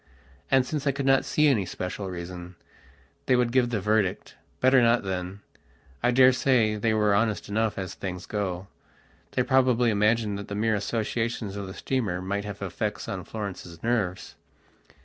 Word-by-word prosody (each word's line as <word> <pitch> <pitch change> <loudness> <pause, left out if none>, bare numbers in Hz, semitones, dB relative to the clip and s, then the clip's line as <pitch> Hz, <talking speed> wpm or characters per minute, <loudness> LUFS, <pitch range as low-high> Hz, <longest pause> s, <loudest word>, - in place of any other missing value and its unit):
And 130 -1 +4
since 150 +1 -3
I - - +4
could 140 0 -4
not 135 0 +4
see 150 0 +3
any 120 -9 +3
special 90 +2 -5
reason, 90 0 -7 0.7
they 130 - +4
would 125 -1 +2
give 125 -1 +3
the 115 -3 -1
verdict: 105 -1 0 0.3
"Better 130 0 +5
not, 115 -1 +3
then." 95 +1 -4 0.6
I - - +3
daresay 130 -3 +4
they 110 +2 0
were 105 -1 +3
honest 110 +1 +1
enough, 110 +1 0
as 95 -2 -4
things 90 -2 -6
go. 95 -3 -3 0.7
They 125 - +2
probably 125 -3 +3
imagined 105 0 +1
that 100 - -7
the 100 - -5
mere 110 +2 +1
associations 115 0 -2
of 100 -1 -5
the 95 - -8
steamer 110 -10 -1
might 100 +2 -3
have 100 -1 -6
effects 105 +3 -3
on 95 -2 -5
Florence's 95 -6 -7
nerves. 105 -6 -1
105 Hz, 170 wpm, -26 LUFS, 95-120 Hz, 0.7 s, Better